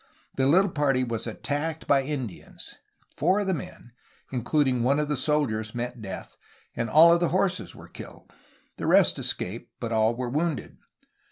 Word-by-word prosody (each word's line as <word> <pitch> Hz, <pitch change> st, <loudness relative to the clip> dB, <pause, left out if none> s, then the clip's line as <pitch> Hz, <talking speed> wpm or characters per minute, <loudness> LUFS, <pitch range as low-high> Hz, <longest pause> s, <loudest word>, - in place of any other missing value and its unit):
The 135 Hz, 0 st, +2 dB
little 185 Hz, +6 st, +4 dB
party 135 Hz, -4 st, +2 dB
was 115 Hz, -2 st, -3 dB
attacked 145 Hz, +7 st, -3 dB
by 140 Hz, -1 st, +4 dB
Indians. 130 Hz, -, -6 dB, 0.4 s
Foiu 185 Hz, +6 st, +3 dB
of -, -, -2 dB
the 190 Hz, -, +1 dB
men, 130 Hz, -5 st, -7 dB, 0.4 s
including 130 Hz, 0 st, +1 dB
one 135 Hz, +5 st, +2 dB
of 150 Hz, -1 st, -1 dB
the 150 Hz, -, +1 dB
soldiers, 125 Hz, -6 st, 0 dB
met 120 Hz, 0 st, -4 dB
death, 95 Hz, -3 st, -8 dB, 0.4 s
and 115 Hz, -1 st, -2 dB
all 165 Hz, +6 st, +8 dB
of 170 Hz, -, +3 dB
the 175 Hz, -, +1 dB
horses 185 Hz, 0 st, 0 dB
were -, -, -12 dB
killed. -, -, -12 dB, 0.4 s
The -, -, -3 dB
rest -, -, +4 dB
escaped, 105 Hz, +6 st, -4 dB
but 115 Hz, -1 st, -4 dB
all 110 Hz, +1 st, +2 dB
were 125 Hz, 0 st, -3 dB
wounded. 155 Hz, -1 st, -2 dB
135 Hz, 170 wpm, -26 LUFS, 120-155 Hz, 0.4 s, all